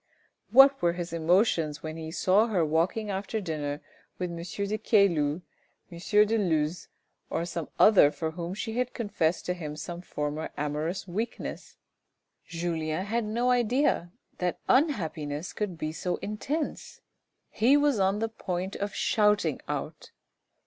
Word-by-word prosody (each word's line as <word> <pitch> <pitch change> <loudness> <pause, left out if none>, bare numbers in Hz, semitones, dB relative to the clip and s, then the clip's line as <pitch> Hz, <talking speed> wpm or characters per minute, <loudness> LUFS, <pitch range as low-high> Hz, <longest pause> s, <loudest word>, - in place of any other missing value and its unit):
What 270 +2 +7
were 170 -1 +3
his 175 -1 -5
emotions 165 -2 +2
when 155 0 -5
he 160 -1 -6
saw 190 +6 +3
her 185 -7 +1
walking 175 +7 0
after 200 +3 -3
dinner 150 -6 -3 0.4
with 180 -1 -3
M. 170 - -6
de 200 +4 -3
Caylus, 175 -8 +2 0.5
M. 205 +5 +3
de 225 +2 +1
Luz, 160 -3 0 0.4
or 170 - -1
some 170 -2 -5
other 200 -9 +7
for 160 +1 -4
whom 170 +2 -5
she 225 +2 -3
had 250 0 -2
confessed 195 -7 -1
to 180 - 0
him 155 -4 -6
some 170 +3 -6
former 150 -2 -4
amorous 150 +6 -2
weakness! 215 +7 -5 0.7
Julien 165 0 -2
had 230 +2 -1
no 235 +4 +1
idea 245 - +1 0.3
that 180 -1 -1
unhappiness 165 - 0
could 200 -5 -3
be 155 -1 -3
so 175 +3 -2
intense; 280 +9 -4 0.5
he 255 +6 +4
was 290 -6 +2
on 195 +1 +2
the 225 +1 0
point 190 -4 -4
of 200 0 -4
shouting 210 -1 +2
out. - - -5
180 Hz, 145 wpm, -28 LUFS, 160-215 Hz, 0.7 s, What